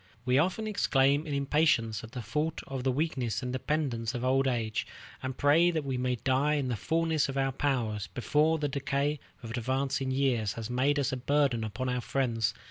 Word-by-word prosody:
We 125 Hz, +2 st, +3 dB
often 185 Hz, +7 st, 0 dB
exclaim 145 Hz, -8 st, +2 dB
in 145 Hz, -, -3 dB
impatience 140 Hz, -7 st, +2 dB
at 115 Hz, -, -11 dB
the 125 Hz, -, -5 dB
thought 150 Hz, +9 st, -2 dB
of 135 Hz, -2 st, -5 dB
the 130 Hz, -, +2 dB
weakness 130 Hz, -4 st, -1 dB
and 125 Hz, 0 st, -3 dB
dependence 130 Hz, -4 st, -1 dB
of 120 Hz, +1 st, -2 dB
old 135 Hz, +1 st, +3 dB
age, 115 Hz, -4 st, -1 dB, 0.3 s
and 130 Hz, 0 st, -4 dB
pray 155 Hz, +5 st, +5 dB
that 160 Hz, -4 st, -1 dB
we 135 Hz, -1 st, -2 dB
may 125 Hz, 0 st, 0 dB
die 135 Hz, +5 st, +1 dB
in 140 Hz, -3 st, -1 dB
the 120 Hz, -, 0 dB
fullness 160 Hz, +4 st, 0 dB
of 135 Hz, -, -4 dB
our 135 Hz, 0 st, +1 dB
powers, 115 Hz, -8 st, -1 dB
before 150 Hz, -, +1 dB
the 150 Hz, -1 st, -1 dB
decay 140 Hz, +1 st, -1 dB, 0.2 s
of 115 Hz, -, -6 dB
advancing 130 Hz, +3 st, -1 dB
years 130 Hz, -6 st, +1 dB
has 115 Hz, +1 st, -6 dB
made 135 Hz, +4 st, +2 dB
us 140 Hz, -1 st, +1 dB
a 130 Hz, -, -2 dB
burden 135 Hz, -3 st, +1 dB
upon 110 Hz, +4 st, -3 dB
our 125 Hz, -1 st, -1 dB
friends. 115 Hz, -4 st, 0 dB
135 Hz, 200 wpm, -30 LUFS, 120-145 Hz, 0.3 s, pray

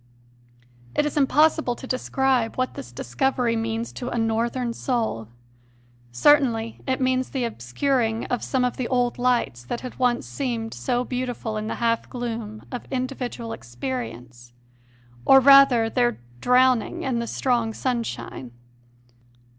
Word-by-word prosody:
It -, -, +2 dB
is 295 Hz, -, -2 dB
impossible 300 Hz, -1 st, +3 dB
to 260 Hz, -, -9 dB
describe 255 Hz, -2 st, 0 dB
what 255 Hz, 0 st, -1 dB
this 120 Hz, -2 st, -8 dB
discovery 230 Hz, -, 0 dB
means 225 Hz, +1 st, -2 dB
to 245 Hz, -, -5 dB
a -, -, -3 dB
Northern 235 Hz, +2 st, 0 dB
soul. 225 Hz, -, -2 dB, 0.8 s
Certainly 230 Hz, -, +3 dB
it 260 Hz, 0 st, 0 dB
means 255 Hz, 0 st, +1 dB
the 265 Hz, -3 st, -2 dB
obscuring 230 Hz, -, -1 dB
of 245 Hz, -, -2 dB
some 260 Hz, -2 st, +1 dB
of 250 Hz, -, -2 dB
the 255 Hz, -, -2 dB
old 245 Hz, -1 st, 0 dB
lights 240 Hz, -, +1 dB
that 235 Hz, -, -4 dB
had 255 Hz, 0 st, -8 dB
once 245 Hz, -1 st, +1 dB
seemed 235 Hz, -5 st, -3 dB
so 240 Hz, -, -1 dB
beautiful 250 Hz, -3 st, -3 dB
in 215 Hz, 0 st, -3 dB
the -, -, -3 dB
half 230 Hz, -1 st, 0 dB
gloom 230 Hz, -3 st, -5 dB
of 245 Hz, -, -6 dB
individual 250 Hz, -3 st, -4 dB
experience, 120 Hz, -1 st, -6 dB, 0.7 s
or 270 Hz, -, +7 dB
rather, 275 Hz, -4 st, +7 dB
their 240 Hz, 0 st, +1 dB, 0.2 s
drowning 250 Hz, -, +3 dB
in 255 Hz, -4 st, 0 dB
the 235 Hz, -, -3 dB
strong 240 Hz, -3 st, 0 dB
sunshine. 230 Hz, -, -4 dB
240 Hz, 140 wpm, -24 LUFS, 225-255 Hz, 0.8 s, or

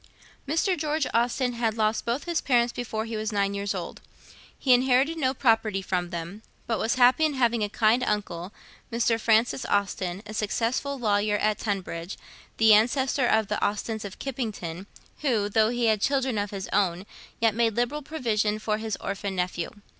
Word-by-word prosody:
Mr. 330 Hz, +6 st, +1 dB
George 305 Hz, -2 st, -1 dB
Austen 245 Hz, +2 st, +1 dB
had 230 Hz, -2 st, -1 dB
lost 215 Hz, 0 st, +1 dB
both 235 Hz, +4 st, -1 dB
his 340 Hz, -2 st, -1 dB
parents 240 Hz, -2 st, +2 dB
before 220 Hz, -2 st, -3 dB
he 225 Hz, 0 st, -5 dB
was 215 Hz, 0 st, -2 dB
nine 200 Hz, -1 st, 0 dB
years 200 Hz, 0 st, -2 dB
old. -, -, -6 dB, 0.6 s
He 260 Hz, -, +4 dB
inherited 260 Hz, +5 st, +3 dB
no 260 Hz, -2 st, +1 dB
property 225 Hz, -6 st, +2 dB
from 180 Hz, -2 st, -2 dB
them; 175 Hz, +4 st, -6 dB, 0.2 s
but 225 Hz, -2 st, -1 dB
was 225 Hz, -, 0 dB
happy 250 Hz, +4 st, +5 dB
in 305 Hz, -2 st, +2 dB
having 235 Hz, -3 st, +2 dB
a 205 Hz, -, -1 dB
kind 225 Hz, +4 st, +2 dB
uncle, 195 Hz, -4 st, -2 dB, 0.4 s
Mr. 230 Hz, 0 st, +1 dB
Francis 225 Hz, +3 st, +2 dB
Austen, 195 Hz, -1 st, -1 dB
a 215 Hz, -, -8 dB
successful 230 Hz, +6 st, -1 dB
lawyer 210 Hz, -3 st, +1 dB
at 215 Hz, +1 st, 0 dB
Tunbridge, 185 Hz, -4 st, -4 dB, 0.4 s
the 220 Hz, -1 st, +6 dB
ancestor 250 Hz, +4 st, +3 dB
of 220 Hz, -2 st, +2 dB
the 210 Hz, -, -2 dB
Austens 215 Hz, +1 st, -2 dB
of 200 Hz, -2 st, -8 dB
Kippington, 205 Hz, -9 st, -5 dB, 0.3 s
who, 235 Hz, -8 st, +1 dB
though 215 Hz, +1 st, +3 dB
he 240 Hz, 0 st, 0 dB
had 215 Hz, -2 st, +2 dB
children 265 Hz, -4 st, +1 dB
of 205 Hz, 0 st, -2 dB
his 195 Hz, -2 st, -5 dB
own, 185 Hz, -2 st, +1 dB, 0.3 s
yet 225 Hz, -2 st, +3 dB
made 225 Hz, -1 st, +1 dB
liberal 250 Hz, +5 st, 0 dB
provision 220 Hz, -8 st, -1 dB
for 215 Hz, 0 st, -2 dB
his 220 Hz, -1 st, -3 dB
orphan 195 Hz, 0 st, -4 dB
nephew. 180 Hz, -2 st, -2 dB
220 Hz, 175 wpm, -26 LUFS, 205-245 Hz, 0.6 s, the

